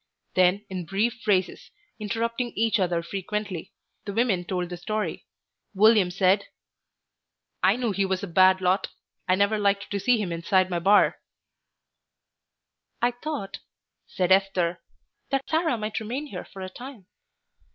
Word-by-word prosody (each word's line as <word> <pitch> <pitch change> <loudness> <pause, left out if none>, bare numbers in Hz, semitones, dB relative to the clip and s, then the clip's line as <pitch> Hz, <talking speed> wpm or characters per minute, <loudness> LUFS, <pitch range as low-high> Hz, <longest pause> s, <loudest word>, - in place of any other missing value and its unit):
Then 185 +3 +3
in 185 -3 -6
brief 225 +6 -1
phrases, 190 -4 0 0.3
interrupting 230 +3 -2
each 225 0 +2
other 175 -2 0
frequently, 195 0 -4 0.3
the 200 - -4
women 215 -5 +1
told 180 -1 -3
the 175 - -6
story. 215 +5 -4 0.5
William 210 -2 +5
said 190 +2 +2 1.2
"I - - +4
knew 240 -3 -1
he 200 0 0
was 190 +1 -2
a - - -3
bad 185 +2 +4
lot. 185 +2 +1 0.4
I 185 - +4
never 200 +2 +2
liked 200 -1 0
to 200 - -1
see 245 +4 +3
him 195 -5 -2
inside 185 +3 +1
my 175 - 0
bar." 200 +4 +4 1.8
"I 240 +1 +2
thought," 245 -6 -5 0.5
said 185 -1 -1
Esther, 185 -3 +2 0.5
"that 275 -1 -1
Sarah 320 -5 +1
might 215 0 -3
remain 245 +7 -4
here 290 - -7
for 190 -2 -10
a - - -4
time." 245 -1 -11
200 Hz, 145 wpm, -25 LUFS, 185-225 Hz, 1.8 s, William